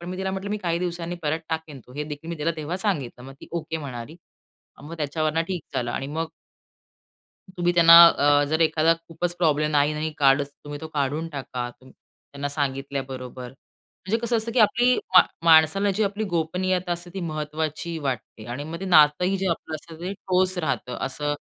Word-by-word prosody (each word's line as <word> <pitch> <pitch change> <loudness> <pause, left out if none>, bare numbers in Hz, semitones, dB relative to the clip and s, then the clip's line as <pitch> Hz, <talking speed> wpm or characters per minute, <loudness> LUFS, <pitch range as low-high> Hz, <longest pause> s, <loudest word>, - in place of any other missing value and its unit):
पण 175 - -8
मी 185 - -5
तिला 190 0 -2
म्हटलं, 190 +1 -4
"मी 210 - 0
काही 170 -3 -1
दिवसांनी 175 -1 -3
परत 155 +2 -1
टाकेन 160 -4 -5
तो" 125 - -15
हे 150 - -2
देखील 150 +2 -8
मी 170 - -4
तिला 155 +2 0
तेव्हा 155 +4 -3
सांगितलं. 150 - -2
मग 135 - -9
ती, - - -12
"ओके" 160 -1 -3
म्हणाली. 135 0 -7 0.7
मग 160 +3 -8
त्याच्यावरनं 155 +2 -1
ठीक 180 -5 -3
झालं 120 -1 -1
आणि 135 - -3
मग 160 +3 -3 1.3
तुम्ही 175 0 +1
त्यांना 165 -1 +7
अ, 145 -2 +3
जर 160 +1 +1
एखादा 160 +1 +4
खूपच 175 +1 -3
प्रॉब्लेम 150 -3 +2
नाही-नाही 150 +2 +1
काढच, 140 0 +3
तुम्ही 145 0 -7
तो 160 - -7
काढून 150 +3 -1
टाका, 130 -4 -5
तुम 130 - -16
त्यांना 140 0 -9
सांगितल्याबरोबर. 135 -3 -4 0.6
म्हणजे 220 +4 +1
कसं 235 0 +1
असतं, 225 +1 -2
की 245 - +1
आपली 245 +3 +4 0.2
मा 180 - +11 0.2
माणसाला 165 +5 +5
जी 215 - +2
आपली 205 +2 -2
गोपनीयता 180 +2 -1
असते 175 +1 -4
ती 195 - -4
महत्त्वाची 155 +2 -3
वाटते 125 -5 -5
आणि 120 +4 -5
मग 165 +3 -7
ते 195 - -5
नातंही 175 +3 +4
जे 190 0 -1
आपलं 160 -1 -3
असतं 160 +1 -12
ते 185 +2 -3
ठोस 185 -1 0
राहतं. 140 -6 -2
असं 145 +2 -2
160 Hz, 185 wpm, -24 LUFS, 145-175 Hz, 1.3 s, मा